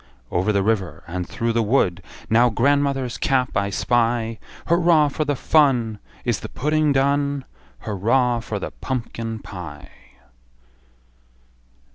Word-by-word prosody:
Over 95 +4 +1
the 100 -2 +1
river, 105 -3 -1
and 90 +1 -5
through 115 0 -1
the 115 - +2
wood 105 -5 +1 0.3
Now 120 +2 +4
grandmother's 135 +1 +1
cap 130 -2 +1
I 100 0 +1
spy! 115 +1 0 0.3
Hurra 170 -3 +4
for 155 - -1
the 145 0 0
fun! 125 -8 +2 0.3
Is - - 0
the - - -7
pudding 150 +2 +1
done? 140 0 +1 0.4
Hurra 115 +4 +1
for 110 -2 -4
the 100 - -5
pumpkin 115 -3 -4
pie! 85 -8 -9
120 Hz, 125 wpm, -22 LUFS, 105-140 Hz, 0.4 s, Now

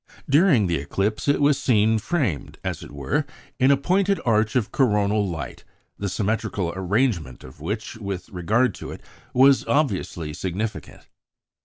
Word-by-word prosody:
During 140 - +4
the 85 -2 0
eclipse, 100 - -2
it 145 - +3
was 145 -1 +3
seen 110 -2 +3
framed, 120 - -2
as - - -3
it - - -10
were, 70 -2 -1 0.4
in 130 - +4
a 140 - +5
pointed 195 +6 +1
arch 110 -1 +2
of 120 -5 +1
coronal 105 -5 +2
light, 80 -3 -6 0.4
the 100 - -2
symmetrical 100 -4 -1
arrangement 95 - -1
of 65 +3 -13
which 110 +7 -4
with 100 -4 -5
regard 105 +6 +1
to - - -6
it - - -8 0.3
was 135 +1 +5
obviously 95 - 0
significant. 95 +7 -5
105 Hz, 150 wpm, -23 LUFS, 90-130 Hz, 0.4 s, a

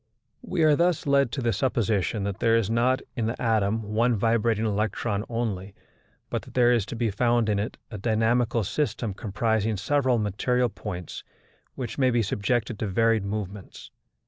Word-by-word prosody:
We 185 -9 -1
are 155 -1 +5
thus 170 +1 +1
led 140 -3 +3
to 135 - -2
the 115 -1 +1
supposition 110 -3 0
that 100 -1 -3
there 115 -1 +3
is 115 -2 +1
not 125 +3 +2
in 115 -4 -1
the 115 - -3
atom 110 -2 +1
one 120 +2 +3
vibrating 115 0 +1
electron 105 -1 -1
only, 105 -5 -3 0.6
but - - -1
that - - -15
there 120 -1 +5
is 115 -4 +1
to 120 - -5
be 115 -2 0
found 120 +1 +2
in 105 -1 +1
it 105 - -4
a 105 - -6
dynamical 115 +2 +1
system 115 -1 -2
comprising 110 +1 -1
several 130 +4 +1
material 120 +4 0
points 90 -4 -7 0.5
which 125 +1 -5
may 130 -1 +4
be 120 -2 +2
subjected 110 +2 -1
to 110 - -1
varied 115 +2 +2
movements. 100 -1 -6
115 Hz, 170 wpm, -26 LUFS, 105-120 Hz, 0.6 s, are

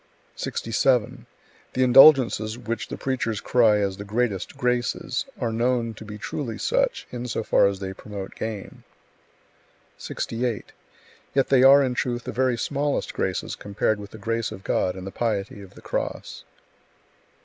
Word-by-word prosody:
67. 125 +1 0 0.5
The 130 - +2
indulgences 125 -4 +6
which 115 -2 -4
the - - -6
preachers 120 -5 -2
cry 115 -3 +4
as 100 -2 -1
the 100 - -6
"greatest 105 -1 -2
graces" 125 0 -1
are 120 -3 -1
known 120 0 0
to 110 - -11
be 105 0 -8
truly 115 +2 -4
such, - - 0
in 125 0 -5
so 115 - -2
far 100 - +4
as 100 -1 -2
they 95 -1 -5
promote 100 -1 -8
gain. 110 -3 -6 1.2
68. 115 -2 -3 0.6
Yet 135 - +2
they 135 -2 +5
are 140 +2 +8
in 130 -2 0
truth 120 -1 -2
the - - -5
very 130 -2 +1
smallest 140 +5 -1
graces - - -2
compared 105 +1 -1
with 100 -1 -9
the 110 - -11
grace 115 +1 -2
of 95 - -9
God 90 0 0
and 95 -1 -8
the 95 - -6
piety 105 -3 -2
of 95 -2 -14
the - - -13
Cross. - - -4
115 Hz, 160 wpm, -24 LUFS, 105-125 Hz, 1.2 s, are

